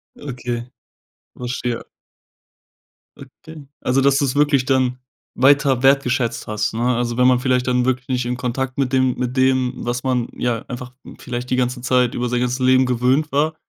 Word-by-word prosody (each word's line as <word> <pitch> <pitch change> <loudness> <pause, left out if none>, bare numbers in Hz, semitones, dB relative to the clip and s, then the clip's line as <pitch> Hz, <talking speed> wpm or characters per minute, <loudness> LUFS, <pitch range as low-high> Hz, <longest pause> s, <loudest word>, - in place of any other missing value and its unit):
Okay. 125 -3 -5 0.7
Verstehe. 125 -1 -4 1.3
Okay. 145 +2 -13
Also 130 +2 +1
dass 140 0 +3
du's 140 -2 0
wirklich 145 -3 +3
dann 130 -2 +1 0.4
weiter 135 -1 +3
wertgeschätzt 130 -3 +2
hast, 105 0 -2
ne? 120 +2 0
Also 120 0 -2
wenn 125 - +4
man 125 -1 +4
vielleicht 125 -1 0
dann 125 0 +1
wirklich 130 -1 -1
nicht 125 -2 -1
in 125 0 -2
Kontakt 130 +1 -3
mit 135 -1 -1
dem 130 -1 +2
mit 125 +1 -3
dem, 130 -1 +2
was 120 +1 -3
man, 125 -2 0
ja, 120 -2 -1
einfach 125 0 -7 0.3
vielleicht 125 0 -5
die 130 - +1
ganze 125 0 -1
Zeit 125 -1 +2
über 120 0 -2
sein 125 - 0
ganzes 125 +1 -1
Leben 130 0 +4
gewöhnt 125 +5 +1
war. 155 +3 +1
125 Hz, 170 wpm, -20 LUFS, 125-130 Hz, 1.3 s, wenn